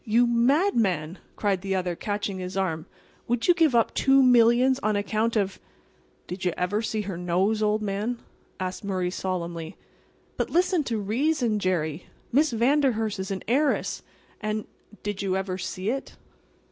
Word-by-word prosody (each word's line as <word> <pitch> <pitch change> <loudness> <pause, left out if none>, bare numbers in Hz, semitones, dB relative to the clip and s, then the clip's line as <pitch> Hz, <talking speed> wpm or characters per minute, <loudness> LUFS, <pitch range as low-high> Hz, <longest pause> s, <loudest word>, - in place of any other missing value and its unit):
"You 235 +2 +3
madman!" 235 - +2 0.2
cried 195 -3 0
the 195 0 -1
other, 180 -2 -1
catching 205 0 -3
his 185 +1 -5
arm. 165 -3 -1 0.4
"Would 240 0 0
you 355 - +7
give 325 -7 +3
up 230 - +3
two 270 0 +4
millions 250 +1 +5
on 215 0 +1
account 215 +3 0
of"— 200 -3 0 0.7
"Did 180 +1 -6
you 180 -2 +1
ever 200 +4 0
see 220 -1 -2
her 195 -4 -5
nose, 185 +5 +1
old 215 0 +1
man?" 210 +4 -2 0.4
asked 185 +1 -4
Murray, 185 -3 -1
solemnly. 170 -3 -4 0.6
"But, - - -1
listen 355 -1 +2
to 230 -3 -1
reason, 230 +2 0
Jerry. 170 -4 -1 0.2
Miss 290 +4 +3
Vanderhurst 235 -4 +1
is 190 - -4
an 195 -1 -4
heiress, 280 +6 +1 0.4
and"— 215 0 -2 0.4
"Did 205 -1 -3
you 190 -1 0
ever 190 -1 -3
see 185 +3 -3
it?" 270 +1 -5
210 Hz, 160 wpm, -26 LUFS, 185-240 Hz, 0.7 s, you